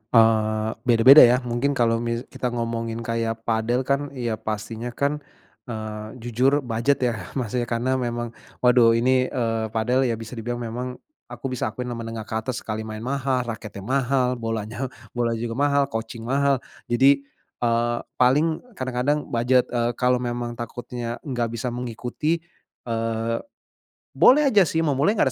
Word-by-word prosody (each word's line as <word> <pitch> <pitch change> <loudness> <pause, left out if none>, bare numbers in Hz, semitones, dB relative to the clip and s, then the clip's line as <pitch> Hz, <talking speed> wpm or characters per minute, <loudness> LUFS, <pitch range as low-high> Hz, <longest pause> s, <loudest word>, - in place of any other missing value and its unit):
Eee, 110 -1 +4 0.2
beda-beda 125 +5 +8
ya, 120 -2 +8
mungkin 125 +4 0
kalo 115 -2 +2
mis 115 0 -2
kita 130 -2 -2
ngomongin 115 -1 -3
kaya 115 0 -1
padel 115 +2 0
kan, 140 +2 0
ya 120 -4 -2
pastinya 110 +2 -4
kan, 145 +1 0 0.5
eee, 110 -1 -6
jujur 130 +5 +2
budget 125 +3 0
ya 120 -3 -1
maksudnya, 120 -1 -1
karena 125 +3 0
memang, 120 -1 -3 0.3
waduh 120 -2 +6
ini, 130 +2 +3
eee, 115 -3 -1
padel 120 +4 +1
ya 115 - 0
bisa 115 0 -9
dibilang 120 0 -4
memang 125 +2 -4 0.3
aku 135 - -6
bisa 125 - -1
akuin 125 -1 -4
menengah 115 -1 -5
ke 110 0 -3
atas, 115 +2 -4
sekali 110 0 -4
main 110 0 -6
mahal, 130 0 0
raketnya 105 -3 -8
mahal, 125 +1 +1
bolanya 115 +2 -3 0.2
bolanya 115 -2 -1
juga 115 +2 -3
mahal, 140 0 +3
coaching 115 +1 -5
mahal. 135 +1 +1 0.2
Jadi, 140 +3 +4 0.3
eee, 120 0 +1 0.2
paling 150 - +3 0.2
kadang-kadang 130 +4 0
budget, 125 +2 +2
eee, 120 -1 0
kalau 125 0 +2
memang 120 -1 -3
takutnya 120 0 -5
nggak 120 -5 -2
bisa 115 +2 -3
mengikuti, 125 +6 -2 0.5
eee, 115 0 -1 0.7
boleh 295 +4 +6
aja 200 -5 +5
sih 160 +2 0
mau 155 - +2
mulai, 145 +11 +2
nggak 135 -10 +2
120 Hz, 155 wpm, -24 LUFS, 115-130 Hz, 0.7 s, beda-beda